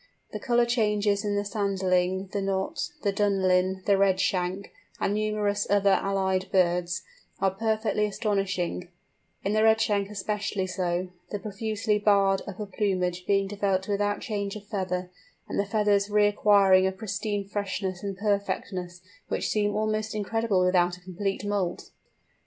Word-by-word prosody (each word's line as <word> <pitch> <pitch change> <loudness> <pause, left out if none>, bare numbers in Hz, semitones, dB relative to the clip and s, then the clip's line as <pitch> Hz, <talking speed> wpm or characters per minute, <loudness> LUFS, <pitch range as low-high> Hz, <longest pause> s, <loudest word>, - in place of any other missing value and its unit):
The - - -5
colour 240 0 +2
changes 210 -4 +1
in 205 -1 -1
the 205 - 0
Sanderling, 190 -2 0
the 200 - -2
Knot, 195 -1 -2
the 200 - +1
Dunlin, 190 -2 +2
the 200 -1 +4
Redshank, 190 -1 +1 0.3
and 200 - 0
numerous 210 -1 0
other 200 -1 +4
allied 190 -1 0
birds, 180 -1 +1 0.4
are 195 - +2
perfectly 220 +1 0
astonishing: 195 -4 -1 0.6
in 200 - 0
the 215 - +3
Redshank 220 -2 +3
especially 205 -1 -2
so, 180 -1 -2 0.2
the 205 - -3
profusely 215 +1 -1
barred 200 -2 +3
upper 200 +1 -5
plumage 185 -3 -1
being 195 -1 +2
developed 195 -2 -1
without 205 0 0
change 200 -3 -3
of 210 -1 -9
feather, 185 -3 -3 0.4
and - - -3
the 200 - +1
feathers 205 -1 +2
reacquiring 205 -2 +5
a - - 0
pristine 205 0 -3
freshness 195 -2 -3
and 195 -2 -4
perfectness 190 -3 -2 0.3
which - - -2
seem 205 -1 +1
almost 215 0 -1
incredible 210 -2 +1
without 180 -1 +2
a - - -19
complete 195 +3 -3
moult! 200 -4 -2
200 Hz, 140 wpm, -27 LUFS, 190-210 Hz, 0.6 s, reacquiring